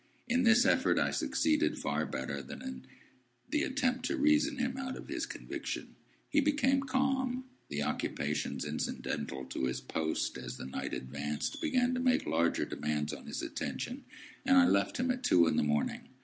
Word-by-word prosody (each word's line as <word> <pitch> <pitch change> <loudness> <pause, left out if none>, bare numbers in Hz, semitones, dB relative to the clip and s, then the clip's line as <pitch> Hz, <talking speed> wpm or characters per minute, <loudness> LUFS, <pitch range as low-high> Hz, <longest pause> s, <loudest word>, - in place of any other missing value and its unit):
In 250 +1 +2
this 240 +1 +6
effort 260 0 +3
I 70 -2 +2
succeeded 70 - +1
far - - -1
better 70 0 -3
than 65 - -9
in 65 0 -6 0.6
the 300 0 +1
attempt 255 -3 0
to 330 - -1
reason 295 0 +3
him 255 0 -1
out 265 -1 -4
of - - -10
his - - -2
conviction. - - -5 0.3
He 295 - +3
became 275 -2 +3
calm; 260 -1 0 0.3
the 75 0 -1
occupations 75 +1 -2
incidental 65 -1 -3
to 65 - -2
his 65 0 -1
post 80 +5 -2
as - - -6
the - - -7
night 70 +1 -3
advanced 70 +3 -3
began 255 -5 +2
to 250 - 0
make 255 0 +3
larger 85 +2 +2
demands 75 0 -2
on - - -9
his - - -4
attention: 255 +3 -4 0.4
and 270 0 +5
I 270 - +8
left - - +2
him 250 +1 +1
at 250 0 -3
two 85 - +5
in 80 - +2
the - - +3
morning. 75 0 0
250 Hz, 175 wpm, -32 LUFS, -, 0.6 s, I